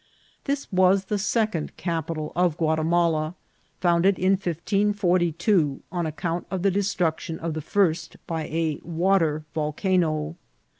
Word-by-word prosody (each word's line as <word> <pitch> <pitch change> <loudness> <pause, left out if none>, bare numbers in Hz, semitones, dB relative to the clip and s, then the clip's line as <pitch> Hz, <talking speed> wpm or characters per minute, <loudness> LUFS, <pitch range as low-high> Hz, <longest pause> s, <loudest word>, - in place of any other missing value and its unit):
This 280 0 -1
was 185 +1 +4
the 205 +1 -1
second 215 -6 -1
capital 165 -2 -3
of 175 -3 +2
Guatimala, 160 0 +1 0.4
founded 175 +2 +3
in 185 +1 +2
1542 180 -3 +1
on 175 -2 -1
account 165 +2 -3
of 190 -2 -3
the 195 - +4
destruction 180 -4 -1
of 165 -1 -3
the 155 - -3
first 165 -2 0
by 160 -2 -3
a 160 -2 -1
water 165 -2 +1
volcano. 155 0 0
170 Hz, 120 wpm, -25 LUFS, 160-190 Hz, 0.4 s, was